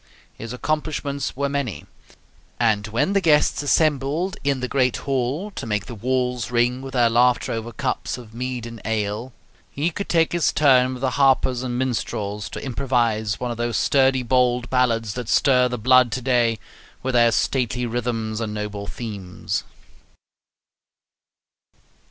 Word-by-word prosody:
His 115 0 -8
accomplishments 145 0 -2
were 140 0 0
many; 140 - -3 0.7
and 110 -3 +2
when 135 - 0
the 200 - +3
guests 150 -4 +3
assembled 150 +4 +1
in 140 -1 +1
the 125 - -2
great 130 -1 +1
hall 140 +9 -2
to 155 - -6
make 105 -2 -1
the - - -8
walls 125 +1 -1
ring 120 +1 +1
with 135 -1 -8
their 120 -2 +4
laughter 120 +2 +2
over 115 +1 -4
cups 130 +1 -3
of 115 -3 -12
mead 125 0 -4
and 115 -2 -9
ale, 110 +3 -2 0.4
he 155 +5 -1
could 200 +5 -5
take 165 -1 +3
his 170 -2 +2
turn 130 -3 +4
with 125 - -9
the 135 - +1
harpers 130 -2 +3
and 125 -1 -3
minstrels 105 -6 -2
to - - -7
improvise 120 -5 0
one 125 -1 -2
of 115 - -5
those 120 0 -1
sturdy 135 -2 +3
bold 125 0 +1
ballads 115 -4 +1
that 125 -3 -5
stir 125 -1 +4
the 125 0 -3
blood 125 +1 +4
to 130 - -2
day 120 -3 +2 0.5
with 130 0 -1
their 120 -1 +5
stately 125 0 0
rhythms 115 -2 -2
and 105 -1 -3
noble 105 -1 -5
themes. 100 -7 -5
125 Hz, 155 wpm, -22 LUFS, 115-135 Hz, 0.7 s, their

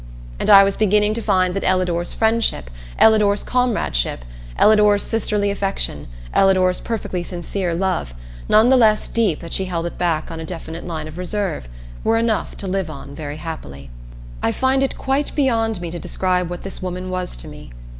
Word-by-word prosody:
And - - -1
I 200 -1 +10
was 195 0 +1
beginning 210 0 +2
to 230 - -3
find 185 -4 +2
that 195 - -3
Ellador's 180 -2 0
friendship, 220 - 0 0.3
Ellador's 210 -2 +4
comradeship, 220 - 0 0.3
Ellador's 210 -1 +5
sisterly 210 -2 0
affection, 195 - -3 0.3
Ellador's 185 -1 +3
perfectly 215 -5 -3
sincere 175 0 -3
love 180 - -1 0.3
none 220 +3 +6
the 265 - +6
less 215 -3 +3
deep 215 -9 0
that 165 - -7
she 190 - 0
held 170 -2 -3
it 170 - -6
back 165 -3 -1
on 165 - -6
a - - -5
definite 165 0 -7
line 160 -3 -4
of 155 +3 -9
reserve 180 - -3 0.3
were 225 0 +2
enough 225 -2 -1
to 195 - -5
live 190 -2 -1
on 140 -2 -9
very 145 0 -6
happily. 70 - -8 0.5
I - - +1
find 265 - +1
it 270 - 0
quite 275 +2 -1
beyond 225 -7 +1
me 170 -2 -5
to 175 - -5
describe 180 0 -1
what 175 0 -6
this 195 - -6
woman 185 0 -4
was 185 - -3
to - - -8
me. - - -11
185 Hz, 180 wpm, -20 LUFS, 170-215 Hz, 0.5 s, I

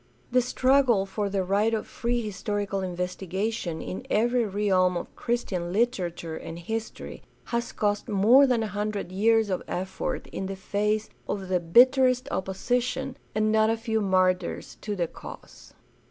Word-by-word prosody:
The 250 +1 +4
struggle 255 -4 +3
for 200 +1 -2
the 195 -1 0
right 205 +4 +2
of 215 - -3
free 240 +1 -2
historical 205 -2 -3
investigation 180 0 -3
in 185 - -5
every 240 +2 +2
realm 190 -3 +2
of - - -7
Christian 190 -8 -2
literature 180 -7 -1
and 165 +1 -7
history 220 +6 -5 0.2
has 235 0 -2
cost 205 +2 -1
more 225 +7 +6
than 240 -3 +2
a - - -2
hundred 210 -2 -3
years 220 +2 +3
of 185 - -1
effort 190 +1 -3
in 190 - -4
the 195 - -4
face 210 +3 -1 0.2
of 190 -2 -3
the 185 -1 +2
bitterest 255 +8 +5
opposition 245 +7 -1 0.2
and 215 0 +2
not 220 0 +4
a 225 - +1
few 225 -1 -1
"martyrs" 185 -2 +1
to 210 -1 -3
the 175 -3 0
cause. - - -12
210 Hz, 155 wpm, -26 LUFS, 190-235 Hz, 0.2 s, more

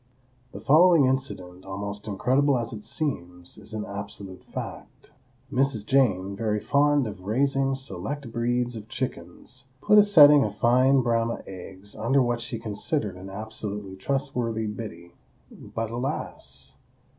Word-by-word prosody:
The 100 - -8
following 155 - +6
incident, 95 -9 -2
almost 100 +2 -6
incredible 130 +7 +2
as 115 -1 -4
it 105 -1 -8
seems, 90 - -4
is 105 +1 -9
an 105 - -3
absolute 100 -2 -8
fact. - - -8 0.4
Mrs. 130 -5 +1
Jane, 100 -8 +2
very 105 0 -1
fond 145 +2 +3
of 100 -4 -7
raising 135 +6 +1
select 130 +2 -5
breeds 120 +1 0
of 110 -1 -9
chickens, 130 +3 -5
put 210 +7 +6
a - - +8
setting 150 -8 +8
of 105 -2 -3
fine 130 +4 +4
Brahma 115 -1 0
eggs 95 +2 -8
under 125 +5 +2
what 120 -2 +1
she 120 0 -3
considered 110 - -2
an 95 +1 -9
absolutely 105 -1 -5
trustworthy 120 -1 -1
Biddy,—but, 105 +2 -8
alas! 125 +3 -3
115 Hz, 135 wpm, -26 LUFS, 100-135 Hz, 0.4 s, a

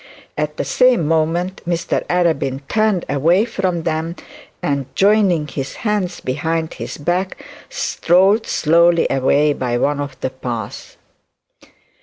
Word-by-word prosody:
At 150 0 -3
the - - -2
same 245 -11 +3
moment 165 +4 0
Mr 170 -1 -1
Arabin 160 -7 0
turned 215 -3 +1
away 165 +9 +2
from 185 -7 -2
them, 160 +1 -2 0.5
and 140 -2 -1
joining 195 -6 +3
his 135 -1 -5
hands 205 -4 -1
behind 160 +4 -2
his - - -7
back 180 +5 -1 0.3
strolled 195 +6 +2
slowly 170 +2 +3
away 145 +3 +2
by 125 -3 -2
one 145 +3 0
of 140 -3 -5
the 130 - -2
paths. 120 -5 -6
165 Hz, 125 wpm, -19 LUFS, 145-180 Hz, 0.5 s, same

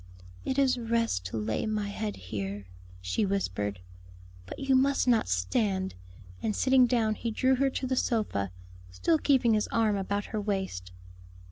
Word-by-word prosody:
"It 265 - -1
is 265 -3 +3
rest 230 - 0
to 95 +4 -4
lay 110 - -1
my 210 -1 -1
head 210 +1 -3
here," 100 +1 -5 0.4
she 90 - 0
whispered. 105 - -1 0.7
"But - - -7
you 270 -1 +2
must 275 +1 +3
not 235 - +3
stand;" 190 - 0 0.5
and 215 - -1
sitting 260 -1 +5
down 230 -3 +2
he 230 - -3
drew 260 +4 +2
her 275 +1 +3
to 265 - -3
the 260 0 0
sofa, 210 - 0 0.4
still 310 - +1
keeping 255 -6 +3
his 210 -1 +1
arm 220 -2 +2
about 200 +1 -2
her 215 - 0
waist. 190 - -3
215 Hz, 160 wpm, -29 LUFS, -, 0.7 s, sitting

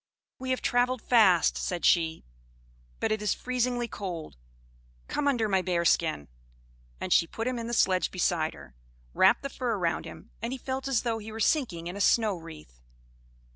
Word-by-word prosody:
"We 260 0 -5
have 255 - -1
travelled 245 0 +1
fast," 200 -8 +4
said 175 -2 -2
she; 160 -2 +2 0.7
"but - - 0
it 215 -1 0
is 210 - 0
freezingly 245 -1 -1
cold. 180 - -6 0.7
Come 295 -1 -1
under 240 -6 +2
my 190 -2 +2
bearskin." 170 - +1 0.7
And - - 0
she 165 - +4
put 225 - -5
him 250 -1 -1
in 230 - -5
the - - -4
sledge 185 -4 +2
beside 170 -3 0
her, 65 - -14 0.4
wrapped - - +4
the - - -1
fur 245 -5 -2
round 170 -3 -1
him, - - -11
and 235 +3 -3
he - - -4
felt 265 +1 -4
as 265 -4 +1
though 230 -2 -1
he 220 +1 -8
were 220 - -7
sinking 220 - 0
in 175 +2 -5
a 200 - -4
snow 215 -1 +3
wreath. 155 - -12
215 Hz, 180 wpm, -28 LUFS, 175-245 Hz, 0.7 s, fast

